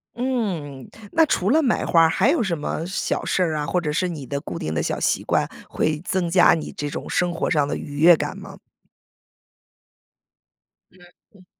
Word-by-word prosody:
嗯， 190 - -3 0.2
那 325 0 +4
除 195 -10 0
了 310 +7 +4
买 245 -5 +1
花 165 - +4
儿， 160 - +5
还 225 - +2
有 295 -4 +2
什 185 -5 -1
么 155 +1 -4
小 185 - -2
事 - - 0
儿 165 -3 +1
啊， 150 -1 -2
或 180 - 0
者 150 - -2
是 175 +5 0
你 155 -7 -6
的 140 +2 -3
固 90 - -6
定 80 - -4
的 80 - -1
小 - - -2
习 - - 0
惯， - - 0 0.2
会 155 -1 -1
增 185 -3 -1
加 175 +1 +5
你 160 - -3
这 145 - -5
种 - - -6
生 175 -1 0
活 165 - -2
上 145 -3 +2
的 - - -2
愉 145 0 -7
悦 165 +3 +7
感 - - -4
吗？ - - -10 2.4
嗯， 185 - -23 0.4
嗯。 185 -2 -19
170 Hz, 215 characters per minute, -22 LUFS, 150-190 Hz, 2.4 s, 悦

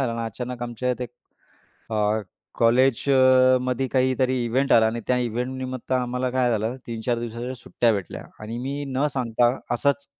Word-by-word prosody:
झालं 120 -4 0
ना, 115 - -2
अचानक 120 +2 -5
आमच्या 120 +1 -3
येथे 125 0 -1 0.9
अ, 110 - -3 0.6
कॉलेज 120 +2 +3
अ, 130 -1 +6
मध्ये 130 +1 -1
काहीतरी 130 -1 +1
इव्हेंट 135 +4 0
आला 115 - +6
आणि 115 +1 -2
त्या 125 - +2
इव्हेंट 125 +2 -2
निमित्त 130 -1 -6
आम्हाला 125 0 0
काय 125 -1 +1
झालं, 110 +3 -1
3-4 115 +1 -2
दिवसांच्या 120 +2 -5
सुट्ट्या 115 -1 0
भेटल्या 100 -4 -5 0.2
आणि 115 +2 -5
मी 140 +3 -4
न 135 +2 0
सांगता 120 -1 +1 0.2
असंच 140 +3 0
125 Hz, 165 wpm, -24 LUFS, 115-130 Hz, 0.9 s, अ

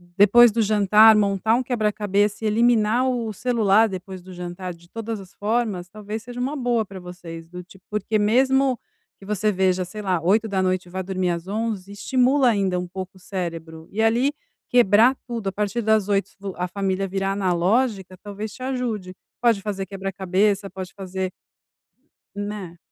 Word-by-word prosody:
depois 215 +4 +7
do 230 +2 0
jantar 215 +1 +6
montar 205 +1 +2
um 255 - 0
quebra-cabeça 210 -3 0
e - - +3
eliminar 230 +2 +3
o 235 -4 -2
celular, 220 -2 +3
depois 185 0 -7
do 185 +1 -13
jantar 180 0 -6
de 170 +1 -20
todas 225 +2 -5
as 190 -2 -13
formas, 210 -4 -1
talvez 215 +2 -6
seja 245 +2 -9
uma 265 +4 -2
boa 245 -5 0
pra 195 -1 -10
vocês 170 -2 -10
do 180 +1 -8
tipo 190 +1 -18
porque 210 +1 -1
mesmo 260 +4 +3 0.4
que 195 - -13
você 210 +1 0
veja, 185 -1 +1
sei 195 +4 -8
lá, 185 -4 0
20h 190 -1 +1
e - - -15
vá 185 +1 -4
dormir 185 -1 -1
às 170 +1 -4
23h, 205 -2 -3
estimula 255 +5 +2
ainda 195 -5 +1
um 180 - -4
pouco 185 +1 -7
o - - -17
cérebro 165 -4 -6
e 215 - -1
ali 235 +5 +3 0.4
quebrar 240 +1 +5
tudo 230 -4 -4
a - - -5
partir 210 +4 -2
das 220 -2 +2
20h 195 -1 +1 0.3
a 180 - -1
família 195 +1 -1
virar 195 +1 -1
analógica 195 +2 0
talvez 205 +1 -6
te - - -13
ajude. 230 -8 -3 0.3
Pode 230 -4 +3
fazer 195 -2 -3
quebra-cabeça, 195 +1 -1
pode 185 -1 -8
fazer 190 -1 -4 1.0
Né? 205 -4 -5
205 Hz, 170 wpm, -23 LUFS, 185-225 Hz, 1.0 s, depois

